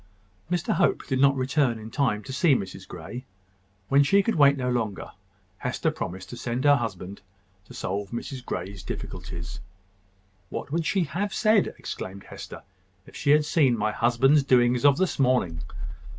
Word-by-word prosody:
Mr 175 -2 0
Hope - - +1
did 130 -2 -1
not 140 0 +5
return 130 -2 +1
in 110 0 -9
time 110 -7 0
to 135 - -7
see 155 -1 +4
Mrs 95 -5 -5
Grey. 125 +2 -8 0.6
When 140 +6 +5
she 195 +8 +4
could 230 - +1
wait 140 -2 +5
no 125 -1 -2
longer, 110 -6 -2 0.5
Hester - - -1
promised 95 +1 -6
to 120 - -7
send 120 +1 -3
her 145 -1 +6
husband 100 -4 -5 0.5
to - - -12
solve 100 +1 -3
Mrs 125 +3 -6
Grey's 95 -3 -5
difficulties. 85 0 -6 0.9
"What - - -6
would 165 +1 0
she 195 -3 +2
have 190 +6 -3
said," 215 -2 +4
exclaimed 95 +1 -7
Hester, - - -10 0.4
"if - - -16
she 145 - -2
had 150 +1 +5
seen 140 -6 +3
my 110 0 0
husband's 125 +6 +3
doings 125 -1 +3
of 140 -1 +6
this 185 -3 0
morning?" 125 - +2
130 Hz, 165 wpm, -26 LUFS, 105-145 Hz, 0.9 s, her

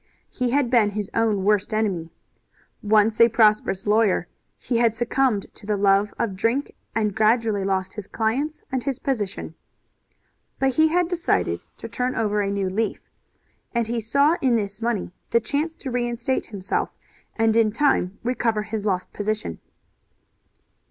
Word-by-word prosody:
He 250 -2 -1
had 265 -1 +1
been 230 -5 +4
his 205 -1 -4
own 220 -4 +1
worst 210 +1 +1
enemy. 190 -7 -1 0.7
Once 215 +1 +3
a 230 - +8
prosperous 215 -4 +3
lawyer 210 -4 +2 0.3
he 240 - -2
had 230 -1 +3
succumbed 240 -2 +1
to 210 - -13
the 210 -1 +1
love 200 +1 +3
of 200 -5 -1
drink 230 +8 0 0.2
and 215 -2 +1
gradually 220 -1 +2
lost 190 -1 -1
his 210 -2 -7
clients 265 +8 -2
and 260 -2 -1
his 275 -3 -2
position. 215 -8 -3 1.0
But 270 -1 +1
he 315 +4 +4
had 350 +2 +2
decided 350 -1 0 0.2
to - - -7
turn 250 0 -2
over 210 -1 +1
a 200 - -1
new 200 -1 -1
leaf, 210 +4 -3 0.6
and 235 -1 +2
he 230 +1 -2
saw 280 +9 +3
in 255 -3 +3
this 205 0 -2
money 225 -6 -1 0.2
the 235 - +4
chance 300 +7 -2
to 265 - -6
reinstate 240 +1 -1
himself, 200 -3 -3 0.4
and 225 -1 +2
in 225 -2 +4
time 210 -7 +1
recover 230 -3 0
his 215 -1 -4
lost 185 -2 -1
position. 210 - -3
225 Hz, 160 wpm, -23 LUFS, 205-245 Hz, 1.0 s, a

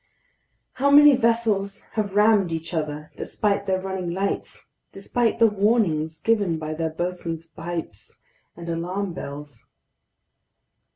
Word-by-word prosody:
How 280 +2 +1
many 290 0 +8
vessels 225 -5 0
have 205 -3 -2
rammed 210 -4 +4
each 165 +1 -5
other, 150 -1 -3
despite 200 -1 -1
their 190 -1 +1
running 190 -2 -4
lights, 195 +3 -3 0.3
despite 225 +4 -1
the 230 - +5
warnings 195 -7 +1
given 205 -7 +1
by 155 0 -4
their 160 +1 -2
bosun's 165 0 -4
pipes 165 - -7 0.4
and 170 0 -9
alarm 180 +3 -3
bells! 145 -5 -9
185 Hz, 120 wpm, -24 LUFS, 165-210 Hz, 0.4 s, many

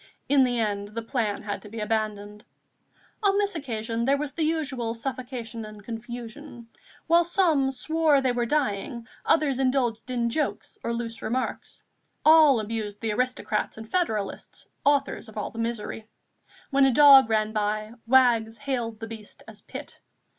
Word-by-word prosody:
In 280 -1 +5
the 245 -2 +1
end 205 -2 -1
the 225 +2 -6
plan 225 -4 -2
had 205 -1 -4
to 210 - -12
be 225 +2 -7
abandoned. 210 -1 -3 0.8
On 400 -1 +3
this 405 0 +1
occasion 230 -7 -3
there 275 +2 +3
was 290 0 -4
the 330 - -5
usual 285 -8 -1
suffocation 245 -2 -5
and 215 -1 -10
confusion. 235 +2 -8 0.4
While 340 +1 +5
some 335 -6 +2
swore 310 +3 +2
they 260 -2 +1
were 240 -1 -1
dying, 235 -3 -1 0.2
others 290 -5 +3
indulged 255 -3 0
in 235 -2 0
jokes 250 -8 -3
or 235 - -1
loose 230 -1 -4
remarks; 255 +3 -3 0.4
all 310 -5 +7
abused 215 -1 -4
the 225 -1 -2
aristocrats 245 -2 -1
and 220 0 -8
federalists, 220 - -2 0.2
authors 280 -4 +1
of 220 - -13
all 210 - -3
the 230 - -8
misery. 225 -1 -4 0.6
When 275 0 +5
a 270 - +4
dog 270 -2 +8
ran 215 -1 +1
by, 215 +1 -1
wags 235 -3 +4
hailed 240 -6 -3
the - - -3
beast 220 -2 -10
as - - -11
Pitt. - - -9
235 Hz, 160 wpm, -26 LUFS, 220-275 Hz, 0.8 s, dog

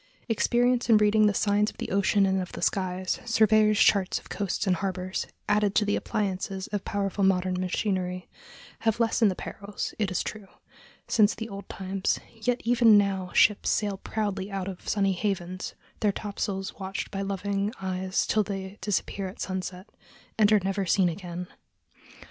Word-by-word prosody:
Experience 240 +2 +2
in 225 - +7
reading 210 0 +4
the 205 - +2
signs 205 0 +2
of - - -15
the - - -5
ocean 195 +1 +3
and 190 0 +1
of 180 - -7
the - - -6
skies, 185 -1 -1
surveyors' 215 -2 +4
charts 195 -2 +4
of - - -11
coasts 200 +1 -2
and 185 -2 +2
harbors, 185 0 -3 0.2
added 205 -1 +2
to 210 - +4
the 205 - +1
appliances 195 -3 -2
of 205 -1 -3
powerful 200 0 -1
modern 185 -1 +2
machinery, 185 -1 -2 0.5
have 225 0 0
lessened 225 -1 +3
the 185 - -2
perils, 200 +2 -6
it 205 -3 +1
is 185 - -1
true, 210 -2 -7 0.6
since 215 -2 +4
the 225 - -5
old 200 -1 -8
times; 190 +1 -1
yet 240 +2 -1
even 235 -2 +6
now 195 -2 0
ships 210 -1 +4
sail 205 -2 0
proudly 205 -1 -3
out 195 -2 -3
of 190 -2 -7
sunny 195 -2 +2
havens, 185 -1 -3 0.2
their 210 - +2
topsails 200 -1 -4
watched 190 -1 -4
by 195 - -3
loving 200 +1 -1
eyes 185 0 -1
till 215 - +2
they 195 0 -5
disappear 195 0 -1
at 185 - -10
sunset, 185 +1 -4 0.5
and 215 -1 +4
are 210 -2 +5
never 195 +1 -1
seen 185 0 +3
again. 175 0 -6
195 Hz, 170 wpm, -27 LUFS, 190-210 Hz, 0.6 s, in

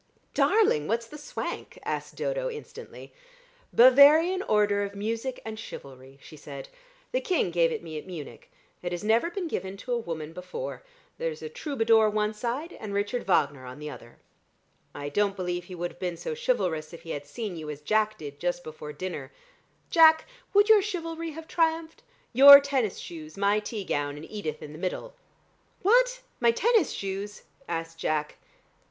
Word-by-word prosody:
"Darling, 405 - +3
what's 230 +2 0
that 300 +6 -11
swank?" 295 - -6
asked - - -4
Dodo - - -2
instantly. 450 -2 -10 0.6
"Bavarian 290 +9 +7
Order 210 - +2
of 200 0 -4
Music 225 +5 -3
and 220 -1 -6
Chivalry," 135 - -10
she - - -12
said. 140 -2 -9 0.4
"The - - 0
King 345 - 0
gave 165 -1 +3
it - - -4
me 160 -2 -6
at - - -13
Munich. 165 -6 -9 0.3
It 175 0 -3
has 175 - -4
never 225 +9 +3
been 355 0 -4
given 190 - -4
to 250 +5 -7
a 240 - +1
woman 160 -6 -5
before. 460 - -6 0.4
There's 480 -2 -3
a 460 - -5
troubadour 230 - +2
one 210 0 0
side, 255 +10 -4
and 205 -2 -5
Richard 205 +4 -1
Wagner 145 -7 +2
on 125 +1 -9
the 150 0 -6
other." 120 -2 -12 0.8
"I 145 - -5
don't 200 +6 +1
believe 180 -2 -3
he 180 - -9
would 175 0 -3
have - - -20
been 180 -2 -3
so 470 - -4
chivalrous 185 - -1
if 170 - -11
he 165 - -7
had 145 0 -5
seen 205 +4 -5
you 155 -2 -7
as 150 -1 -6
Jack 215 +7 +1
did 145 -2 -9
just 175 +1 -2
before 155 -1 -8
dinner. 150 -4 -6 0.6
Jack, 320 -1 +7 0.3
would 410 +1 +5
your 435 -2 +7
chivalry 330 -4 -4
have 320 +1 -9
triumphed? 325 -1 0 0.3
Your 280 +3 +11
tennis 270 -7 -1
shoes, 155 0 -9
my 200 +1 +3
tea 210 0 -5
gown, 145 -4 -2
and 150 - -8
Edith 160 -8 -5
in 150 - -8
the 155 - -10
middle." 195 - -4 0.7
"What! - - +4 0.2
My 235 - +4
tennis 420 - +3
shoes?" 200 +1 -5 0.2
asked 165 0 -4
Jack. 150 -1 -2
210 Hz, 175 wpm, -27 LUFS, -, 0.8 s, Your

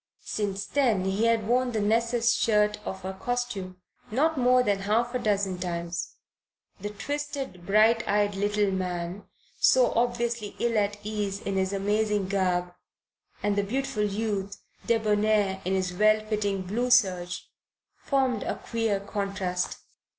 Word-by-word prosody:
Since 200 -2 -2
then 230 -8 +1
he 195 +4 +1
had 230 -2 +2
worn 250 +1 +2
the 220 - 0
Nessus 230 +2 +2
shirt 210 -1 +2
of 190 -1 -5
a 190 - -3
costume 205 -4 -3 0.3
not 310 +8 +2
more 250 -1 +4
than 205 -4 +1
half 225 +5 0
a 250 - 0
dozen 200 -4 0
times. 170 -1 -4 0.6
The 205 +2 -4
twisted, 275 -4 -5
bright 220 +3 +4
eyed 205 0 +2
little 205 0 +1
man, 180 0 -3 0.3
so 255 -2 +5
obviously 235 -2 -1
ill 235 -1 0
at 205 -1 +1
ease 205 -2 -2
in 195 - -3
his 190 0 +1
amazing 205 0 0
garb, 180 -2 0 0.7
and 205 -1 +1
the 205 - +2
beautiful 240 +1 -2
youth, 205 -1 -2 0.3
debonair 210 -3 +2
in 190 +1 +1
his 185 -1 -1
well 215 +3 +4
fitting 205 -3 -1
blue 230 +7 -1
serge, 180 -7 +2 0.5
formed 260 -5 +1
a - - -2
queer 225 -4 -1
contrast. 195 -3 -3
210 Hz, 145 wpm, -27 LUFS, 195-230 Hz, 0.7 s, so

